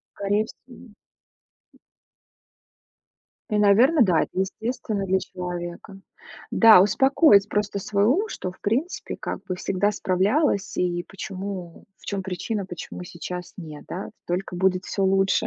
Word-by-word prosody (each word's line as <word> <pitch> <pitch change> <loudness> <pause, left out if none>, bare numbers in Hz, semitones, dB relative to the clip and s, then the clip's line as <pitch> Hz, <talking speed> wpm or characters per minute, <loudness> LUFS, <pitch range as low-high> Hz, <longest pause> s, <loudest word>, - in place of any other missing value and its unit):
Скорей 205 +2 0
всего. 245 0 -15 2.6
И, 210 - +1
наверно, 235 +9 +5
да, 180 -7 +3
это - - -4
естественно 210 +1 -2
для 190 0 +2
человека. 180 +2 -7 0.5
Да, 225 -5 +8
успокоить 210 - +4
просто 205 -1 -1
свой 200 +1 0
ум, 360 - +2
что, 185 - -5
в - - -24
принципе, 260 - -2
как - - -4
бы 185 - -4
всегда 195 +2 0
справлялась, 200 - +1
и 175 -1 -1
почему, 190 -2 -7
в - - -19
чём 200 -1 -2
причина, 190 +3 -3
почему 180 0 -8
сейчас 180 0 -7
нет, 155 -5 -9
да? 185 - -5 0.2
Только 180 +1 -3
будет 185 0 +1
всё 195 - -1
лучше. 195 0 +2
195 Hz, 130 wpm, -24 LUFS, 180-210 Hz, 2.6 s, Да